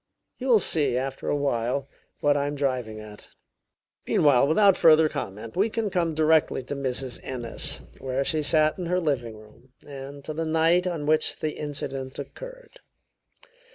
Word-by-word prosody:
You 260 - -4
will 240 -4 +6
see, 150 - +2
after 135 +1 -4
a - - +1
while, 135 -1 -1 0.3
what 145 0 +3
I 145 0 0
am 145 - -3
driving 125 -6 -2
at. 105 -1 -12 0.8
Meanwhile, 140 -3 +4
without 195 +5 +5
further 160 -1 +6
comment, 110 -4 -6
we 200 +4 +2
can 220 -2 -2
come 170 -3 0
directly 155 -3 +2
to 145 - -5
Mrs. 130 -2 -2
Ennis, 120 -3 -1 0.2
where 130 +1 -2
she 155 +2 0
sat 155 +3 +2
in 175 - -3
her 180 +1 +1
drawing 125 -9 -2
room, 110 +4 -19
and 140 0 -9
to 155 - -4
the 165 +2 -3
night 165 +3 +2
on 165 -5 -3
which 155 +1 +1
the 155 -1 -2
incident 135 -3 -6
occurred. - - -10
145 Hz, 165 wpm, -25 LUFS, 130-160 Hz, 0.8 s, will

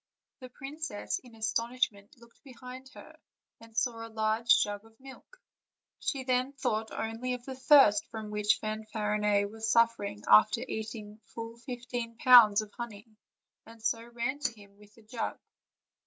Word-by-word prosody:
The 255 -2 -10
princess, 275 -3 -5
in 245 -3 -17
astonishment, 225 -2 -2
looked 235 0 -20
behind 255 -1 -11
her, - - -14 0.4
and 225 0 -16
saw 230 -1 -1
a - - -14
large 220 +1 +3
jug 205 -1 -5
full 225 - -19
of 225 - -36
milk; 270 - -14 0.6
she 270 -4 -2
then 255 +1 0
thought 220 -6 -2
only 230 +3 -3
of 245 -1 -12
the 265 - -6
thirst 260 -5 +5
from 215 -1 -7
which 210 0 +2
Fanfarinet 210 -1 -1
was 220 0 -4
suffering 230 - +2
after 105 0 +6
eat 220 +1 -4
ing 210 0 -10
full 230 0 -8
fifteen 240 -1 -6
pounds 225 -4 +7
of 210 - -14
honey, 225 -2 -9 0.5
and 225 -1 -15
so 230 0 0
ran 240 +4 -3
to 280 -5 -1
him 200 -1 -17
with 210 0 -18
the 225 - -19
jug. 225 +2 -4
230 Hz, 160 wpm, -30 LUFS, 215-250 Hz, 0.6 s, pounds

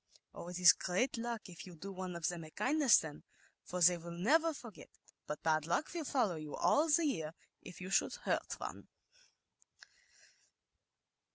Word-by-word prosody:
"Oh, - - -8
it 180 0 -5
is 180 -2 +8
great 190 +9 -1
luck, 230 -1 -4
if 180 0 -10
you 180 - -11
do 195 +5 -8
one 185 -2 -5
of 170 -2 -1
them 175 -2 -3
a 155 - -10
kindness 275 - +4
then, 150 -2 -4 0.4
for 180 0 -5
they 175 0 +6
will 170 +1 -9
never 320 - +3
forget 235 -9 -11
it; - - -28
but 150 - -5
bad 155 -1 +1
luck 175 - -1
will 335 -3 -4
follow 175 - -1
all 310 +3 +3
e - - 0
year 160 - -2 0.3
if 175 - -11
you 185 +1 -7
should - - +2
hurt - - -2
one. - - -7
180 Hz, 175 wpm, -35 LUFS, 170-245 Hz, 0.4 s, is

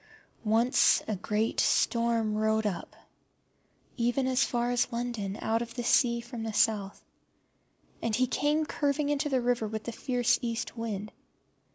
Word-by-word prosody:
Once 230 +4 +4
a 215 - -1
great 210 +3 -1
storm 230 -2 +2
rode 220 0 +1
up, 190 -5 -4 1.0
even 245 +2 +1
as 260 0 +2
far 240 0 0
as 245 +1 +1
London, 235 -4 -3
out 225 +1 +1
of 230 -1 -6
the 240 - -3
sea 235 0 +3
from 240 0 -7
the 225 0 -3
South; 205 -2 0 1.0
and 225 -2 0
he 255 +3 +3
came 295 +4 +1
curving 290 0 -1
into 290 +1 0
the 265 -2 +2
river 240 -2 0
with 220 0 -5
the 235 - -4
fierce 245 0 +1
East 230 -1 -3
wind. 215 -3 -4
235 Hz, 155 wpm, -29 LUFS, 220-245 Hz, 1.0 s, Once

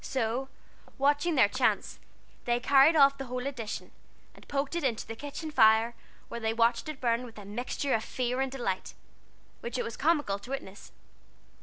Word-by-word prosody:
So, 255 +1 -2 0.5
watching 290 +4 +2
their 255 -7 +6
chance, - - 0 0.5
they 240 0 +1
carried 275 +5 +5
off 275 -2 +5
the 270 - -4
whole 250 +1 -4
edition, 245 -6 -5 0.4
and - - -17
poked 280 +1 -2
it 340 - -1
into 235 -5 -1
the 225 - -7
kitchen 290 +5 -6
fire, 220 -2 +5 0.3
where 235 - -6
they 225 0 -1
watched 235 +7 +2
it 300 -3 -6
burn 235 -1 +1
with 230 -3 -11
a 205 - -9
mixture 245 +6 -2
of 220 - +1
fear 250 +1 -2
and 270 -1 -1
delight 235 -8 -3 0.6
which 235 +1 -5
it - - 0
was 230 - -5
comical 290 -11 +1
to 205 - -13
witness. 245 -7 -7
250 Hz, 180 wpm, -29 LUFS, 225-275 Hz, 0.6 s, their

